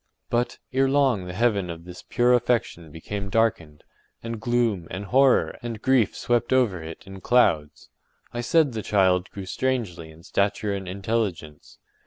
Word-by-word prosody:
But, 120 +1 0 0.2
ere 135 +1 +3
long 135 -9 +2
the 90 - -6
heaven 100 -3 +1
of 85 0 -8
this 90 0 -10
pure 120 +1 +2
affection 120 -9 0
became 100 +6 -6
darkened, 95 -9 0 0.4
and 115 -1 -5
gloom, 115 -7 0
and 95 +4 -5
horror, 135 +4 +3
and 115 -2 -5
grief 130 -4 +2
swept 120 -1 0
over 120 -9 +2
it 80 0 -9
in 95 0 -10
clouds. 80 -12 +1 0.4
I 120 - -3
said 150 +3 +3
the 110 - -3
child 95 -3 +2
grew 100 -1 -8
strangely 100 -7 -2
in 80 +1 -16
stature 100 +2 0
and 95 -1 -5
intelligence. 95 -6 -3
105 Hz, 160 wpm, -24 LUFS, 90-120 Hz, 0.4 s, ere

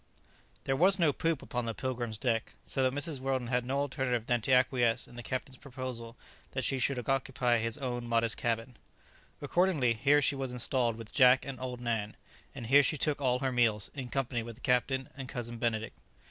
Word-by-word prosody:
There 135 - 0
was 185 +6 +6
no 165 -6 +3
poop 165 -1 -1
upon 125 -1 -3
the 115 -1 -3
"Pilgrim's" 120 -4 -3
deck, 115 0 -1
so 135 - 0
that 130 0 +1
Mrs. 150 -2 -2
Weldon 130 -2 -2
had 125 -1 +1
no 135 +2 0
alternative 130 -4 -1
than 120 -1 +1
to 130 - -1
acquiesce 125 -2 +3
in 120 - -15
the 120 - -6
captain's 130 +2 -4
proposal 125 -4 -7 0.4
that - - -2
she 135 - 0
should 135 +2 +1
occupy 130 -3 +1
his 115 0 -1
own 120 -4 -4
modest 115 -1 +1
cabin. 115 +1 -2 0.7
Accordingly, 150 -6 +2
here 140 +6 +4
she 145 - +1
was 135 -2 -3
installed 120 -1 +1
with 115 -1 -9
Jack 130 -2 +6
and 135 -2 -6
old 125 -1 -5
Nan; 110 -3 -2 0.4
and 120 - -6
here 135 +5 +6
she 145 +3 0
took 145 0 0
all 125 -2 +2
her 135 -1 0
meals, 115 -5 +2
in 135 -3 -5
company 125 -3 -1
with 115 0 -8
the 125 - -19
captain 130 +1 +1
and 135 -2 -7
Cousin 120 -2 -5
Benedict. 115 -2 -1
125 Hz, 200 wpm, -31 LUFS, 115-135 Hz, 0.7 s, was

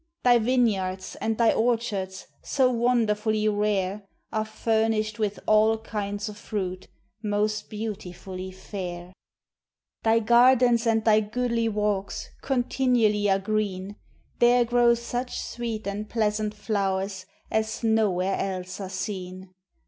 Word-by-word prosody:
Thy 245 -1 +6
vineyards, 205 -6 0
and 220 0 -1
thy 230 -2 +4
orchards, 220 -5 -1 0.2
So 260 -2 +2
wonderfully 220 -3 +1
rare, 205 -1 0 0.3
Are 215 0 0
furnished 220 0 0
with 210 -2 -1
all 215 +1 +4
kinds 205 -2 -4
of 210 0 -8
fruit, 190 -4 -4 0.3
Most 210 0 -1
beautifully 190 -3 -6
fair. 185 -2 -7 0.9
Thy 225 0 +3
gardens 240 +1 +5
and 225 -1 +2
thy 215 -1 +6
goodly 230 +1 -1
walks 205 -2 -2
Continually 245 -5 +2
are 195 - +4
green; 200 -1 -2 0.4
There 240 0 +5
grow 240 0 +4
such 245 +1 -4
sweet 230 -2 -4
and 205 +2 -4
pleasant 215 -1 0
flowers 195 -2 -2 0.2
As 220 +1 -1
nowhere 200 -4 +2
else 185 0 -4
are 190 - -5
seen. 185 -1 -5
215 Hz, 120 wpm, -26 LUFS, 195-230 Hz, 0.9 s, Thy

